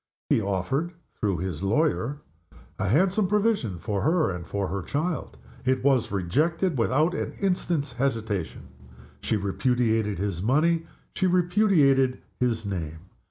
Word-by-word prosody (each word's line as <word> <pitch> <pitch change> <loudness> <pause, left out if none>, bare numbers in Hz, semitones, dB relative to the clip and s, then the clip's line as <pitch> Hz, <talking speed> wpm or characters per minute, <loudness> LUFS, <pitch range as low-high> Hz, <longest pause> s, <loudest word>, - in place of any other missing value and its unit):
He - - +4
offered 115 - -1 0.2
(through 100 -4 -1
his 90 -2 -4
lawyer 135 +5 +1 0.4
) - - -23
a - - 0
handsome 185 - +3
provision 205 - +1
for 100 +2 -2
her 160 - +2
and 90 -1 -6
for 100 -1 -2
her 100 +1 -3
child. 155 - -3 0.3
It 130 0 +1
was 135 -4 +2
rejected, 150 - 0
without 150 +9 +2
an - - -3
instant's 175 -7 -1
hesitation. 115 -8 -2 0.5
She 110 - 0
repudiated 110 0 0
his 95 -2 -2
money 160 - +2 0.3
she 190 - +1
repudiated 175 -8 +3 0.2
his 120 -3 0
name. 85 -1 -5
125 Hz, 135 wpm, -26 LUFS, 100-165 Hz, 0.5 s, He